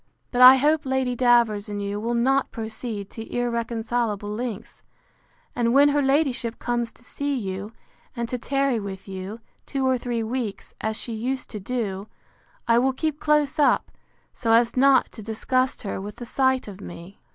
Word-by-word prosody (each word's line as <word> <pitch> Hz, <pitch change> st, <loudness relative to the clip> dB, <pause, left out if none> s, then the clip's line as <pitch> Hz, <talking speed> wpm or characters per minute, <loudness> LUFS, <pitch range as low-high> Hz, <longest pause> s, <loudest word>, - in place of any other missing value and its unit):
—But 245 Hz, -, +1 dB
I 255 Hz, +1 st, +11 dB
hope 295 Hz, +3 st, +2 dB
Lady 265 Hz, -2 st, 0 dB
Davers 235 Hz, -4 st, +3 dB
and 205 Hz, 0 st, -4 dB
you 200 Hz, 0 st, -3 dB
will 235 Hz, +2 st, -1 dB
not 265 Hz, +3 st, +2 dB
proceed 220 Hz, -2 st, -6 dB
to 225 Hz, 0 st, -8 dB
irreconcilable 235 Hz, -3 st, -1 dB
lengths; 225 Hz, -1 st, -5 dB, 0.7 s
and 235 Hz, 0 st, +1 dB
when 285 Hz, +1 st, +7 dB
her 290 Hz, 0 st, +2 dB
ladyship 270 Hz, -4 st, +1 dB
comes 240 Hz, -1 st, -2 dB
to -, -, -20 dB
see 285 Hz, +3 st, -3 dB
you, 200 Hz, -2 st, -4 dB, 0.4 s
and 235 Hz, -1 st, -2 dB
to 250 Hz, +1 st, -3 dB
tarry 275 Hz, -2 st, 0 dB
with 195 Hz, -2 st, -7 dB
you, 195 Hz, +4 st, -7 dB, 0.3 s
two 270 Hz, -1 st, -1 dB
or 260 Hz, -1 st, +2 dB
three 235 Hz, -2 st, -2 dB
weeks, 230 Hz, -2 st, -4 dB
as 220 Hz, 0 st, -1 dB
she 235 Hz, -, -5 dB
used 255 Hz, +4 st, -3 dB
to 210 Hz, -, -5 dB
do, 205 Hz, -2 st, -3 dB, 0.6 s
I 230 Hz, 0 st, +5 dB
will 265 Hz, +2 st, +2 dB
keep 305 Hz, +2 st, -2 dB
close 300 Hz, -1 st, +2 dB
up, 290 Hz, -, +3 dB, 0.4 s
so 225 Hz, -2 st, +1 dB
as 230 Hz, 0 st, +4 dB
not 270 Hz, +1 st, +4 dB
to 220 Hz, -, -10 dB
disgust 255 Hz, +5 st, -1 dB
her 195 Hz, -2 st, -4 dB
with 205 Hz, +1 st, -7 dB
the 240 Hz, -, -8 dB
sight 260 Hz, +1 st, +1 dB
of 200 Hz, -1 st, -9 dB
me. 175 Hz, +2 st, -10 dB
235 Hz, 175 wpm, -24 LUFS, 215-260 Hz, 0.7 s, I